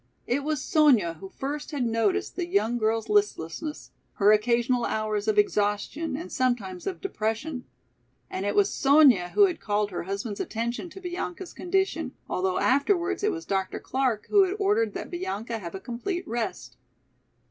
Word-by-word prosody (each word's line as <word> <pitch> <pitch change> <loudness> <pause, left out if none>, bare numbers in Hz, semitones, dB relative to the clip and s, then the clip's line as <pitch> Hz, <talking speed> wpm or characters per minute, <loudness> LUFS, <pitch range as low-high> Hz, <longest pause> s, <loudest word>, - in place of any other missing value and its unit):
It 270 +4 0
was 300 -2 -1
Sonya 245 - +4
who 195 - -8
first 290 +7 -5
had 285 -5 -1
noticed 235 - 0
the 355 -2 -2
young 240 - +1
girl's 220 0 0
listlessness, 315 - -1 0.2
her 205 +1 +4
occasional 235 +3 +2
hours 215 -1 -1
of 215 -1 +2
exhaustion 210 +9 +1
and 335 - -7
sometimes 240 -9 -1
of 375 - -4
depression. 250 - -3 0.6
And 190 - -4
it 205 0 -1
was 205 0 +3
Sonya 270 -11 +5
who 410 - +8
had 360 -4 -2
called 205 -1 0
her 175 - -3
husband's 200 +2 -4
attention 235 +9 -3
to 385 +3 -11
Bianca's 360 0 -5
condition, 360 -6 -1
although 185 0 0
afterwards 340 +7 +2
it 425 - +3
was 335 -3 -5
Dr. 195 -1 -1
Clark 255 -5 -1
who 410 - +7
had 380 +1 -2
ordered 420 +2 +1
that - - -6
Bianca 240 - -3
have 170 -3 -7
a - - -4
complete 250 - -4
rest. 220 - -4
245 Hz, 165 wpm, -27 LUFS, 210-345 Hz, 0.6 s, who